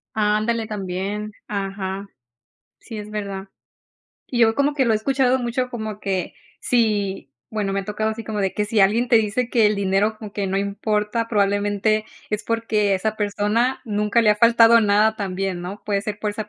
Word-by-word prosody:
Ándale 215 +1 +1
también. 200 +1 -4
Ajá. 195 -1 -4 0.7
Sí 225 -3 -9
es 210 0 -8
verdad. 200 -2 -5 0.8
Y 240 -2 -2
yo 225 -1 +5
como 285 +1 +1
que 270 -3 +2
lo 230 - +2
he - - +3
escuchado 260 +2 +2
mucho, 250 +1 -2
como 220 -3 -5
que 190 -3 -3 0.3
si, 205 - 0 0.2
bueno, 205 -3 -2
me 195 - 0
ha - - -9
tocado 215 +1 -1
así 225 +1 -5
como 210 -2 -3
de 190 -1 0
que 210 - -1
si 215 -1 +1
alguien 225 +5 +3
te 235 - +6
dice 225 +3 +1
que 230 -3 +3
el 210 -1 +1
dinero 200 +2 +1
como 210 -2 -9
que 200 -2 -2
no 190 +1 0
importa, 210 +3 -1
probablemente 205 +1 +1 0.3
es 210 0 -2
porque 215 -3 +1
esa 215 +3 -1
persona 210 +4 0
nunca 210 +1 +1
le 220 - +3
ha 210 - +3
faltado 230 0 +6
nada 215 +1 +3
también, 190 -2 -3
¿no? 195 +3 -7
Puede 200 -1 0
ser 210 -1 -4
por 210 -1 -2
esa 210 0 -6
210 Hz, 190 wpm, -22 LUFS, 200-225 Hz, 0.8 s, te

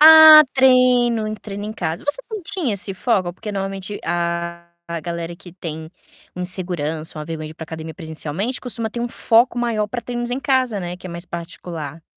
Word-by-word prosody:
Ah, 315 0 +11
treino, 250 -4 +4
treino 205 -1 -6
em 215 - -4
casa, 165 -6 -4
você 290 +11 +1
não 430 -3 -5
tinha 320 - +1
esse 200 0 0
foco, 190 -4 0
porque 210 +4 -7
normalmente 195 0 -4
a 170 0 -2 0.2
a 170 0 -3
galera 170 +1 -5
que 175 0 -14
tem 160 -3 -7 0.5
insegurança, 175 -4 -2
uma 150 - -5
vergonha 155 -1 -5
de 155 - -10
para 160 - -9
academia 160 0 -7
presencialmente 160 - -4
costuma 230 -3 -2
ter 235 - -5
um 240 - -1
foco 235 +1 +3
maior 230 -3 0
para 235 +3 -5
treinos 240 +1 -3
em 250 - -1
casa, 260 -6 +1
né, 175 0 -5
que 185 - -9
é - - -7
mais 170 +1 -7
particular. 165 -3 -7
195 Hz, 185 wpm, -21 LUFS, 170-240 Hz, 0.5 s, Ah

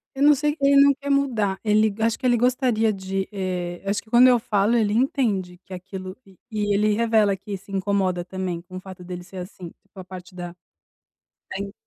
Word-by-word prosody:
eu 275 - 0
não 295 +1 +8
sei, 295 +2 0
ele 280 0 +5
não 280 0 +6
quer 280 +1 -7
mudar. 235 -9 +1
Ele, 215 0 +3
acho 225 0 +1
que 260 - -7
ele 245 -1 +4
gostaria 245 -2 +2
de, 195 0 -3
eh, 180 -3 -4
acho 205 +1 0
que 220 - -23
quando 240 +3 +7
eu 250 -1 +5
falo, 215 0 +1
ele 215 -3 +2
entende 215 -7 0
que 190 - -10
aquilo, 185 0 -7
e 190 -2 -20
e 205 -1 0
ele 210 +1 +2
revela 220 -2 +3
que 195 +1 -6
se 195 +1 -16
incomoda 190 -2 0
também 185 -2 -4
com 185 +1 -10
o - - -5
fato 185 -1 -11
dele 180 0 -7
ser 190 +1 -12
assim, 180 -1 -8
tipo 200 0 -16
a - - -7
parte 185 0 -11
da 175 -1 -6 1.0
da 190 - -4
in 200 - -9
200 Hz, 215 wpm, -23 LUFS, 185-230 Hz, 1.0 s, não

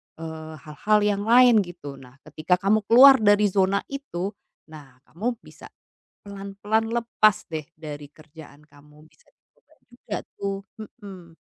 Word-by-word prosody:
eee, 160 -1 -9
hal-hal 210 +8 0
yang 205 -1 0
lain, 240 -1 +6
gitu. 170 -7 -7
Nah, 125 -1 -16
ketika 155 +4 -1
kamu 195 +4 +1
keluar 265 +3 +8
dari 205 0 +3
zona 195 +1 +1
itu, 205 -10 -5 0.4
nah, 140 -5 -14
kamu 235 +8 -4
bisa - - -14 0.5
pelan-pelan 200 +3 -3
lepas 230 -3 +1
deh 155 -2 -5
dari 150 -2 -9
kerjaan 155 -1 -16
kamu, 150 +1 -20
bisa - - -30
dicoba - - -34 0.2
juga 240 -3 -8 0.2
tuh, 200 0 -3 0.2
mhm. 195 -6 -12
195 Hz, 135 wpm, -23 LUFS, 155-215 Hz, 0.5 s, keluar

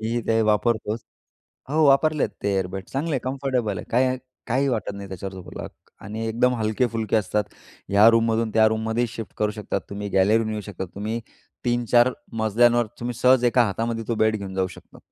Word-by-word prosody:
मीही 115 +2 -1
ते 115 0 +3
वापरतोच. 110 +1 +1 0.7
हो, 155 +1 +3
वापरले 150 +2 +4
आहेत. - - +1
ते 100 - +1
एअर 95 -1 0
बेड 95 +1 -6
चांगले 145 +5 -3
आहेत, 135 - 0
कम्फर्टेबल 130 -6 -1
आहेत, - - -8
काही 130 +2 +2 0.3
काहीही 130 +3 +1
वाटत 110 -5 -1
नाही 100 0 -8
त्याच्यावर 95 +1 -6
झोपायला. 90 -1 -8 0.4
आणि 110 +2 -4
एकदम 125 +3 +2
हलके-फुलके 110 0 0
असतात, 105 0 0 0.4
ह्या 100 +3 +6
रूममधून 115 0 +2
त्या 110 -1 +6
रूममध्येही 110 +2 0
शिफ्ट 115 -1 -8
करू 105 0 +1
शकता 105 -1 -3
तुम्ही. 100 0 -4
गॅलरीतून 110 +4 +3
नेऊ 110 -1 -3
शकता 100 -2 -6
तुम्ही, 110 +3 -3 0.4
3-4 120 0 +3 0.3
मजल्यांवर 120 +2 +3
तुम्ही 120 +1 -3
सहज 125 +1 +4
एका 120 0 +4
हातामध्ये 115 +2 -2
तो 120 - +1
बेड 110 0 +2
घेऊन 100 -2 -7
जाऊ 95 -1 +1
शकता. - - -15
115 Hz, 185 wpm, -24 LUFS, 105-120 Hz, 0.7 s, ह्या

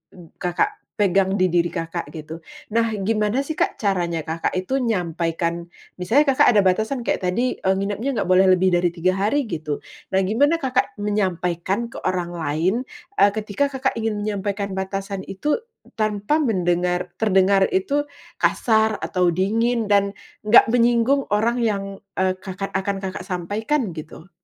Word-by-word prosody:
m 175 -3 -14
Kakak 175 -1 0 0.2
pegang 195 -1 +2
di 185 -3 +2
diri 175 0 +3
Kakak 165 0 -4
gitu. 155 +2 -7 0.3
Nah 230 0 +1
gimana 215 +5 0
sih, 315 - -5
Kak, - - +1
caranya 175 -6 -1
Kakak 165 +3 -2
itu 185 +9 -1
nyampaikan 170 -5 -1 0.3
misalnya 230 +12 +3
Kakak 260 - +4
ada 205 - +5
batasan 220 +7 +1
kayak - - 0
tadi, 240 +8 0
eee, 190 0 +1
nginapnya 205 +6 -2
nggak 195 -4 -1
boleh 190 +1 +6
lebih 185 0 +4
dari 175 0 +3
3 180 +2 +2
hari 270 +9 +1
gitu. 155 -9 -4 0.3
Nah 190 - +3
gimana 275 - +3
Kakak 265 -6 -1
menyampaikan 195 +1 -1
ke - - -7
orang 180 -2 -2
lain, 165 +3 0 0.5
eee, 200 0 +6
ketika 215 +6 -1
Kakak 265 -2 -1
ingin 220 -1 -1
menyampaikan 200 -1 -2
batasan 195 +1 -4
itu 295 - -1 0.4
tanpa 215 +7 +1
mendengar 180 - 0
terdengar 195 -2 +4
itu 285 +10 0 0.3
kasar 220 -2 +2
atau 180 -2 +1
dingin 225 +3 +1
dan 200 0 +3 0.3
nggak 225 +1 +7
menyinggung 240 +3 +3
orang 230 +4 +1
yang, 210 -4 0 0.3
eee, 185 0 0
Kakak 190 +1 -6
akan 195 +1 -1
Kakak 190 0 -4
sampaikan 205 - -1
gitu? 160 +2 -10
195 Hz, 150 wpm, -22 LUFS, 180-225 Hz, 0.5 s, nggak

